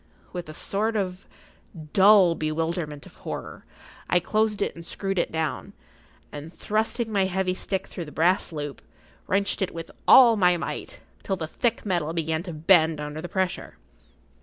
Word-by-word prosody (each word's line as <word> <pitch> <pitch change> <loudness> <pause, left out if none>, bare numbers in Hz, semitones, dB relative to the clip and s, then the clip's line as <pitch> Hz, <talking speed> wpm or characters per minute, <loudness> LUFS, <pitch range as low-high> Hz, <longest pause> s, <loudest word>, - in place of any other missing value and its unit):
With 175 -3 -5
a - - -7
sort 215 +6 -1
of 185 -2 -3 0.7
dull 195 -3 +7
bewilderment[Pg 155 -1 -3
47] - - -14
of - - -15
horror, - - -6 0.4
I 180 - +4
closed 215 +3 0
it - - -2
and 170 - -9
screwed 195 +2 -3
it - - 0
down, 160 -1 -3 0.6
and 150 +2 -8
thrusting 220 +4 -1
my 200 -2 +2
heavy 190 0 0
stick 190 +1 -3
through 175 - -7
the 150 - -10
brass 175 +4 +2
loop, 145 -3 -5 0.5
wrenched 200 +1 0
it 190 - -2
with 165 -1 -7 0.2
all 240 -3 +9
my 180 -3 +4
might, - - -6 0.2
till 195 - -2
the 165 -4 -4
thick 235 +9 -1
metal 170 -5 -1
began 160 -1 -1
to 175 0 -7
bend 160 0 +4
under 150 +1 -5
the 175 - -6
pressure. 190 -2 -2
180 Hz, 170 wpm, -25 LUFS, 160-195 Hz, 0.7 s, all